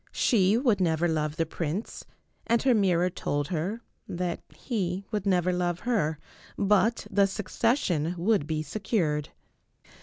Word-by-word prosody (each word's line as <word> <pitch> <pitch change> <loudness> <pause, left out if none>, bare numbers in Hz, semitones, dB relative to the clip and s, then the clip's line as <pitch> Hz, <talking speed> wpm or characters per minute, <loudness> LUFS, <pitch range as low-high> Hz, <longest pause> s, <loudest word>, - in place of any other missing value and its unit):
She 205 -3 +3
would 235 -6 +2
never 165 -1 +2
love 155 -2 -1
the 165 -1 0
prince, 165 +6 -4 0.4
and 235 0 +2
her 260 -2 +4
mirror 185 -4 +2
told 145 -4 -2
her 185 +7 -2 0.3
that 175 -1 -3
he 195 -5 -3
would 210 -2 -2
never 180 -1 +2
love 175 -1 -1
her, 205 -11 0 0.4
but 210 +3 +2
the 200 -1 +4
succession 195 - 0
would 180 -3 +1
be 155 -1 -1
secured. 155 - -1
185 Hz, 140 wpm, -27 LUFS, 165-210 Hz, 0.4 s, her